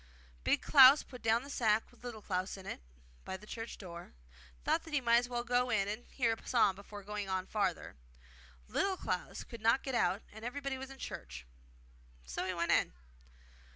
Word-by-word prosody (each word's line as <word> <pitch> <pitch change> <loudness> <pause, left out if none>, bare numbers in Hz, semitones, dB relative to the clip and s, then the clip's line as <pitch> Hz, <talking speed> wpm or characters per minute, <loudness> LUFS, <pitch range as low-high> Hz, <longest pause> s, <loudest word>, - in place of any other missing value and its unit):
Big - - +2
Klaus 275 0 +8
put 250 -2 -11
down 225 +2 +2
the 280 - -10
sack 220 -4 +2
with 245 - -22
Little 230 -4 -7
Klaus 185 0 -2
in 190 - -11
it - - -6 0.4
by 190 - -5
the 210 - -14
church 225 +2 -6
door, 170 -3 -8
and - - -24
thought - - +2
that 320 -2 -4
he - - +4
might 235 -2 +4
as 245 +1 0
well 240 -1 -2
go 245 +1 +1
in 205 -4 +2
and 215 +4 -5
hear 235 -4 +1
a 225 - -10
psalm 215 -6 +4
before 205 +1 -10
going 205 0 -4
on 185 -1 -1
farther. 210 +1 -2 0.7
Little 390 -1 0
Klaus - - -3
could 235 -2 -10
not 230 +4 +3
get 265 - -3
out, 200 -3 +1
and 220 +1 -10
everybody 270 +2 -3
was 265 0 -7
in 270 - -10
church; 60 - -7 0.8
so 65 - -3
he 185 - -1
went 170 0 0
in. - - +3
220 Hz, 205 wpm, -34 LUFS, 190-245 Hz, 0.8 s, Klaus